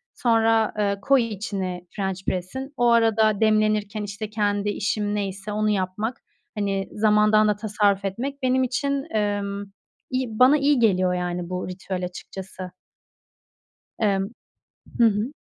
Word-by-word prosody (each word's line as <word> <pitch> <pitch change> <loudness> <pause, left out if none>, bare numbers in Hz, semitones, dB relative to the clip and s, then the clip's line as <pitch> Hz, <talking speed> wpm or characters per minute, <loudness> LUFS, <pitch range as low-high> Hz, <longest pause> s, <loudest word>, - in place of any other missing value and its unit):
sonra, 225 -2 +2
eee, 200 -1 0
koy 270 +4 +4
içine 190 -4 -4
french 190 -2 -3
press'in. 260 +10 -3
O 240 0 +3
arada 220 -2 +3
demlenirken, 215 -1 +2
işte, 205 +1 -5
kendi 205 -1 0
işim 205 0 -1
neyse 200 0 -4
onu 215 +1 0
yapmak, 210 +5 -1 0.4
hani, 195 -1 -1
zamandan 215 0 +4
da 210 - +2
tasarruf 205 -2 +1
etmek 270 +9 -4
benim 260 0 +3
için, 275 +2 -1
emm, 205 -1 -1 0.4
iyi. 255 -4 -3
Bana 260 +4 +7
iyi 285 -1 +3
geliyor, 185 -5 +3
yani, 180 -1 -3
bu 185 0 -3
ritüel 185 0 -4
açıkçası. 185 0 -8 1.3
Emm, 200 -1 +1 0.7
hı 235 - +7
hı. 220 +5 +1
210 Hz, 130 wpm, -24 LUFS, 195-225 Hz, 1.3 s, Bana